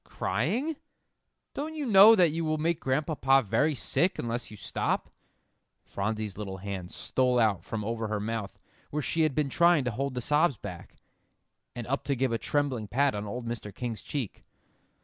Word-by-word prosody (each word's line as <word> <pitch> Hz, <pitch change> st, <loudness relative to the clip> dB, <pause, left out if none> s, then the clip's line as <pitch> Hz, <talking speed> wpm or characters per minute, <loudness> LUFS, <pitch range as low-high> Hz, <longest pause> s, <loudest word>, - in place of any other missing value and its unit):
"Crying? 215 Hz, -, -1 dB, 0.8 s
Don't 310 Hz, +3 st, -4 dB
you 300 Hz, -2 st, -3 dB
know 215 Hz, 0 st, +9 dB
that 175 Hz, -6 st, +4 dB
you 165 Hz, +2 st, -2 dB
will 155 Hz, -1 st, 0 dB
make 165 Hz, +1 st, 0 dB
Grandpapa 135 Hz, -1 st, +2 dB
very 150 Hz, +9 st, +2 dB
sick 175 Hz, +7 st, +1 dB
unless 120 Hz, +1 st, -3 dB
you 105 Hz, -, -11 dB
stop?" 95 Hz, -, -2 dB, 0.7 s
Phronsie's 105 Hz, 0 st, -3 dB
little 95 Hz, -2 st, -5 dB
hand 95 Hz, -2 st, -5 dB
stole 125 Hz, +3 st, 0 dB
out 105 Hz, -7 st, +2 dB
from 105 Hz, +1 st, -4 dB
over 115 Hz, 0 st, -2 dB
her 105 Hz, 0 st, -2 dB
mouth 110 Hz, -1 st, -4 dB, 0.3 s
where 150 Hz, 0 st, -2 dB
she 160 Hz, +7 st, 0 dB
had 155 Hz, -4 st, +2 dB
been 150 Hz, -2 st, +1 dB
trying 170 Hz, 0 st, +4 dB
to 125 Hz, -, -1 dB
hold 135 Hz, +2 st, -3 dB
the -, -, -1 dB
sobs 150 Hz, +1 st, +2 dB
back, -, -, -9 dB, 0.8 s
and 120 Hz, -2 st, -5 dB
up 135 Hz, +4 st, -2 dB
to 140 Hz, -, 0 dB
give 130 Hz, -1 st, 0 dB
a 115 Hz, -, 0 dB
trembling 135 Hz, -7 st, -1 dB
pat 140 Hz, +5 st, +2 dB
on 105 Hz, 0 st, -4 dB
old 120 Hz, +4 st, -5 dB
Mr. 115 Hz, -3 st, -5 dB
King's 115 Hz, 0 st, -5 dB
cheek. 135 Hz, -9 st, -5 dB
130 Hz, 180 wpm, -28 LUFS, 110-155 Hz, 0.8 s, know